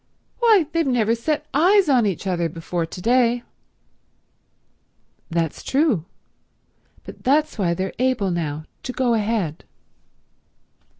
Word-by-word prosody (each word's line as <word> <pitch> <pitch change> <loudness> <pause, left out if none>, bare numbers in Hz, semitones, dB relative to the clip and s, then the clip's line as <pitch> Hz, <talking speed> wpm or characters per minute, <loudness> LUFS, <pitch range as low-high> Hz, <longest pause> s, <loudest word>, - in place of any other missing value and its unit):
Why 440 -8 +5
they've 330 -2 0
never 230 -4 +2
set 300 +6 -2
eyes 365 +6 +4
on 250 -6 +3
each 195 -1 -3
other 175 -3 0
before 165 +1 -4
to 180 - -9
day." 240 0 +2 1.9
"That's 165 -2 -2
true. 270 - +1 1.0
But - - -12
that's 290 -1 +1
why 170 -3 +1
they're 190 +2 -3
able 250 -7 +1
now 155 -3 -3 0.2
to 255 - -5
go 250 -2 +1
ahead." 210 -7 -1
230 Hz, 120 wpm, -22 LUFS, 175-275 Hz, 1.9 s, Why